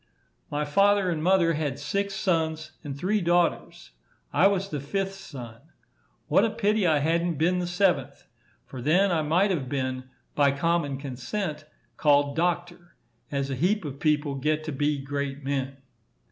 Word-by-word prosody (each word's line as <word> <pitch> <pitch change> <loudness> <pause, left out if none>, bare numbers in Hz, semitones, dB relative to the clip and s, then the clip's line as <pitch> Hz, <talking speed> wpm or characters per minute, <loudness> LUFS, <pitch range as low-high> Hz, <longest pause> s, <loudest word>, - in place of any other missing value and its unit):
My 150 0 -1
father 200 +4 +3
and 160 -2 -2
mother 175 -1 +3
had 145 -4 -2
six 200 +7 -2
sons 160 -4 -1
and 140 -3 -6
three 195 +7 0
daughters. 170 - 0 0.4
I 165 +7 +5
was 195 -1 0
the 150 - -3
fifth 195 +7 -2
son. 120 -11 -10 0.7
What - - +4
a 230 - +3
pity 215 -3 +1
I 155 -2 +4
hadn't 165 +3 +1
been 175 +5 +1
the 175 - -2
seventh! 180 +1 0 0.4
For 130 - -8
then 180 +8 +3
I 165 -2 +2
might 175 +7 +2
have 140 -8 -2
been, 130 -2 -2 0.3
by 140 -2 +3
common 145 -1 0
consent, 150 +5 -4 0.3
called 145 -1 +3
doctor, 175 +1 -2 0.3
as 140 -1 -2
a - - -1
heap 180 +7 +1
of 140 -1 -6
people 150 -2 +1
get 150 +3 -1
to 155 - -4
be 145 +1 0
great 140 0 -4
men. 135 -1 -2
155 Hz, 160 wpm, -26 LUFS, 140-180 Hz, 0.7 s, I